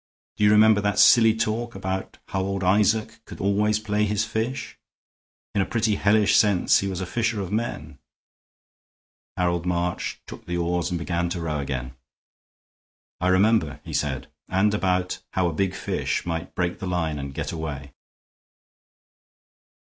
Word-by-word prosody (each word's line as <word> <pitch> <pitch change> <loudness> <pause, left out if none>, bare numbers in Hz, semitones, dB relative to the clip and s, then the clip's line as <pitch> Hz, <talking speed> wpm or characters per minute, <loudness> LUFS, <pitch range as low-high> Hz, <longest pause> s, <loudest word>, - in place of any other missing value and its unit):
Do - - -1
you 105 - +6
remember 105 0 +6
that 100 0 0
silly 110 +2 +6
talk 115 +1 -2
about 95 0 -4
how 95 - -1
old 95 0 -2
Isaac 105 +3 +2
could - - -10
always 105 +2 +2
play 105 -1 -1
his 105 +1 0
fish? 115 +5 -4 0.7
In 100 - +2
a - - +1
pretty 110 -2 +1
hellish 105 +1 +3
sense 100 -4 +4
he 100 - -2
was 95 -1 -3
a - - -2
fisher 115 +2 -1
of 95 -2 -4
men." 115 +3 -3 1.4
Harold 85 -1 0
March 90 0 -2
took - - -11
the 90 0 -2
oars 85 0 -1
and 90 - -2
began 85 0 -1
to 85 - -3
row 80 -3 -2
again. 65 -2 -4 1.3
"I 90 - 0
remember," 95 -6 +3
he - - -8
said, 70 -3 -2 0.2
"and 100 +3 +2
about 90 -2 0
how 95 -2 +1
a 85 - -2
big 95 +3 -1
fish - - -2
might 80 -1 -4
break 90 -1 -1
the 95 - -5
line 80 -4 -1
and 70 0 -5
get - - -4
away." 75 -4 -6
95 Hz, 160 wpm, -24 LUFS, 85-105 Hz, 1.4 s, you